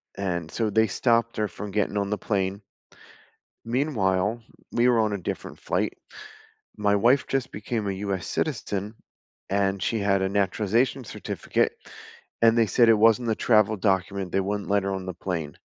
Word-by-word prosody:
And 85 Hz, -5 st, -3 dB
so 110 Hz, +5 st, -1 dB
they 110 Hz, +2 st, +3 dB
stopped 115 Hz, +2 st, +1 dB
her 105 Hz, 0 st, +1 dB
from 105 Hz, 0 st, -7 dB
getting 105 Hz, 0 st, 0 dB
on 100 Hz, -1 st, -1 dB
the 105 Hz, -, -1 dB
plane. 100 Hz, -2 st, -1 dB, 1.0 s
Meanwhile, 115 Hz, -5 st, 0 dB, 0.3 s
we 120 Hz, +1 st, +3 dB
were 120 Hz, -2 st, +4 dB
on 110 Hz, -1 st, +2 dB
a 100 Hz, -, -1 dB
different 90 Hz, -, -6 dB
flight. -, -, -1 dB, 0.8 s
My 105 Hz, -1 st, +2 dB
wife 125 Hz, +7 st, +3 dB
just 135 Hz, -1 st, -1 dB
became 105 Hz, +1 st, -3 dB
a 100 Hz, -, -1 dB
US 95 Hz, -2 st, -3 dB
citizen, 100 Hz, +2 st, -2 dB, 0.5 s
and 100 Hz, -1 st, 0 dB
she 115 Hz, +4 st, 0 dB
had 100 Hz, -1 st, +2 dB
a 95 Hz, -, +1 dB
naturalization 105 Hz, +6 st, 0 dB
certificate, 95 Hz, -, -2 dB, 0.6 s
and 115 Hz, 0 st, +5 dB
they 115 Hz, -, +5 dB
said 115 Hz, +4 st, +4 dB
it -, -, +8 dB
wasn't 115 Hz, +2 st, +4 dB
the 110 Hz, -, +1 dB
travel 110 Hz, -2 st, +3 dB
document, 95 Hz, -1 st, -1 dB
they 95 Hz, -, +2 dB
wouldn't 100 Hz, +1 st, -3 dB
let 100 Hz, -1 st, +2 dB
her 100 Hz, -, -1 dB
on 95 Hz, -1 st, -4 dB
the 95 Hz, -, -4 dB
plane. 85 Hz, -5 st, -4 dB
105 Hz, 170 wpm, -25 LUFS, 95-115 Hz, 1.0 s, it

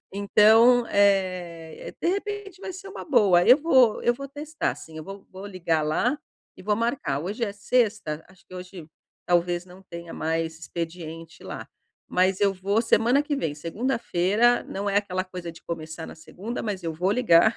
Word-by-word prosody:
Então, 220 Hz, +4 st, +5 dB
eh, 185 Hz, -5 st, 0 dB
de -, -, +1 dB
repente 400 Hz, 0 st, -3 dB
vai 380 Hz, -, -6 dB
ser 375 Hz, +2 st, -9 dB
uma -, -, -8 dB
boa, 200 Hz, -, +4 dB
eu 250 Hz, -, +8 dB
vou 260 Hz, -8 st, +4 dB
eu 240 Hz, -, +3 dB
vou 275 Hz, +2 st, -7 dB
testar 300 Hz, +3 st, -3 dB
sim, 160 Hz, -1 st, -12 dB
eu 155 Hz, -, -7 dB
vou 195 Hz, +2 st, -10 dB
vou 190 Hz, +1 st, -10 dB
ligar 170 Hz, -5 st, -1 dB
lá, 230 Hz, -, 0 dB, 0.4 s
e -, -, -12 dB
vou 210 Hz, +1 st, +1 dB
marcar, 230 Hz, -, -1 dB
hoje 210 Hz, +8 st, -2 dB
é 200 Hz, -, -4 dB
sexta, 205 Hz, -7 st, 0 dB
acho 190 Hz, 0 st, -22 dB
que -, -, -13 dB
hoje 180 Hz, -3 st, -9 dB, 0.4 s
talvez 175 Hz, 0 st, +1 dB
não 185 Hz, +2 st, -15 dB
tenha 170 Hz, -2 st, -9 dB
mais 160 Hz, 0 st, -2 dB
expediente 165 Hz, -1 st, -7 dB
lá. -, -, -7 dB, 0.4 s
Mas 185 Hz, +1 st, +2 dB
eu 200 Hz, -1 st, +4 dB
vou 200 Hz, +4 st, 0 dB
semana 240 Hz, +4 st, +3 dB
que 290 Hz, 0 st, -2 dB
vem, 160 Hz, -, -2 dB
segunda-feira, 210 Hz, -, +1 dB
não 200 Hz, +1 st, -3 dB
é 200 Hz, -, 0 dB
aquela 185 Hz, -2 st, 0 dB
coisa 180 Hz, -3 st, -7 dB
de 165 Hz, -, -16 dB
começar 160 Hz, -1 st, -6 dB
na -, -, -10 dB
segunda, 205 Hz, +8 st, -7 dB
mas 200 Hz, -4 st, -3 dB
eu 165 Hz, -1 st, -3 dB
vou 180 Hz, +5 st, 0 dB
ligar, 220 Hz, -2 st, +4 dB
195 Hz, 180 wpm, -25 LUFS, 170-235 Hz, 0.4 s, eu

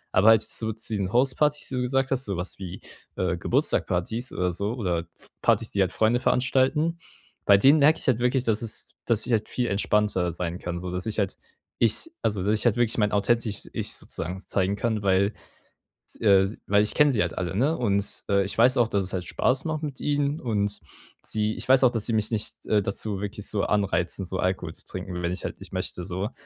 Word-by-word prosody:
Aber 95 Hz, +3 st, +5 dB
halt 110 Hz, -1 st, +6 dB
so 110 Hz, -1 st, -2 dB
zu 110 Hz, +1 st, -3 dB
diesen 100 Hz, -3 st, -1 dB
Hauspartys, 135 Hz, +4 st, +2 dB
die 130 Hz, -, -4 dB
du 125 Hz, -, 0 dB
gesagt 130 Hz, +2 st, 0 dB
hast, 135 Hz, 0 st, 0 dB
sowas 95 Hz, -1 st, -4 dB
wie, 95 Hz, -1 st, -7 dB, 0.3 s
äh, 90 Hz, -1 st, 0 dB
Geburtstagspartys 95 Hz, +8 st, 0 dB
oder 90 Hz, -1 st, 0 dB
so, 100 Hz, +5 st, -2 dB
oder 90 Hz, -8 st, -2 dB, 0.3 s
Partys, -, -, +2 dB
die 100 Hz, -, +1 dB
halt 95 Hz, -, +2 dB
Freunde 110 Hz, +2 st, +2 dB
veranstalten 135 Hz, +6 st, +1 dB, 0.5 s
bei 100 Hz, -, +7 dB
denen 135 Hz, +9 st, +6 dB
merke 150 Hz, +3 st, +5 dB
ich -, -, -6 dB
halt 125 Hz, -3 st, +3 dB
wirklich, 125 Hz, +1 st, +1 dB
dass 110 Hz, -2 st, +1 dB
es 115 Hz, -, -7 dB
dass 115 Hz, -2 st, +2 dB
ich 125 Hz, -, 0 dB
halt 110 Hz, -2 st, 0 dB
viel 125 Hz, -1 st, -1 dB
entspannter 100 Hz, -3 st, +1 dB
sein 85 Hz, +1 st, -4 dB
kann, 85 Hz, 0 st, -4 dB
so, 90 Hz, 0 st, -5 dB
dass 90 Hz, +1 st, -3 dB
ich 110 Hz, 0 st, -1 dB
halt 100 Hz, -2 st, -1 dB, 0.4 s
Ich 115 Hz, -, +1 dB
also, 105 Hz, -3 st, 0 dB
dass 105 Hz, +2 st, +2 dB
ich -, -, -2 dB
halt 120 Hz, -1 st, +3 dB
wirklich 120 Hz, -2 st, +1 dB
mein 105 Hz, -2 st, +2 dB
authentisches 105 Hz, +1 st, 0 dB
Ich -, -, -3 dB
sozusagen 90 Hz, +3 st, -5 dB
zeigen 95 Hz, 0 st, -1 dB
kann, 110 Hz, -1 st, -1 dB
weil 100 Hz, +2 st, +2 dB, 0.7 s
s -, -, -16 dB
äh, 100 Hz, -3 st, +5 dB
se 105 Hz, -, -7 dB
weil 105 Hz, +1 st, +4 dB
ich 105 Hz, -, -1 dB
kenne 150 Hz, -1 st, +5 dB
sie 115 Hz, -, 0 dB
halt -, -, -3 dB
alle, 90 Hz, 0 st, -3 dB
ne? 145 Hz, +9 st, +2 dB
Und, 100 Hz, -4 st, -1 dB
äh, 100 Hz, -1 st, +3 dB
ich 100 Hz, -, -4 dB
weiß 125 Hz, +3 st, +5 dB
auch, 120 Hz, -2 st, +4 dB
dass 100 Hz, -3 st, 0 dB
es 95 Hz, -, -5 dB
halt 90 Hz, -2 st, -3 dB
Spaß 130 Hz, -, 0 dB
macht 155 Hz, -1 st, -2 dB
mit 140 Hz, -3 st, -5 dB
ihnen 145 Hz, +1 st, 0 dB
und 105 Hz, -3 st, -1 dB, 0.4 s
sie 110 Hz, 0 st, -1 dB
ich -, -, -5 dB
weiß 130 Hz, 0 st, +6 dB
auch, 125 Hz, -, +6 dB
dass 115 Hz, -3 st, -1 dB
sie 115 Hz, -, 0 dB
mich 110 Hz, -1 st, +1 dB
nicht 110 Hz, -2 st, -4 dB
äh, 105 Hz, -, +3 dB
dazu 100 Hz, 0 st, -3 dB
wirklich 105 Hz, 0 st, -4 dB
so 100 Hz, -2 st, -1 dB
anreizen, 100 Hz, -2 st, 0 dB
so 95 Hz, +1 st, -4 dB
Alkohol 95 Hz, +1 st, -1 dB
zu -, -, -11 dB
trinken, 95 Hz, -, -6 dB
w 90 Hz, -, -3 dB
wenn 85 Hz, 0 st, -1 dB
ich 90 Hz, -, -5 dB
halt -, -, -4 dB
ich -, -, -11 dB
möchte, 90 Hz, -, -3 dB
so. 95 Hz, +3 st, -3 dB
105 Hz, 230 wpm, -26 LUFS, 95-125 Hz, 0.7 s, bei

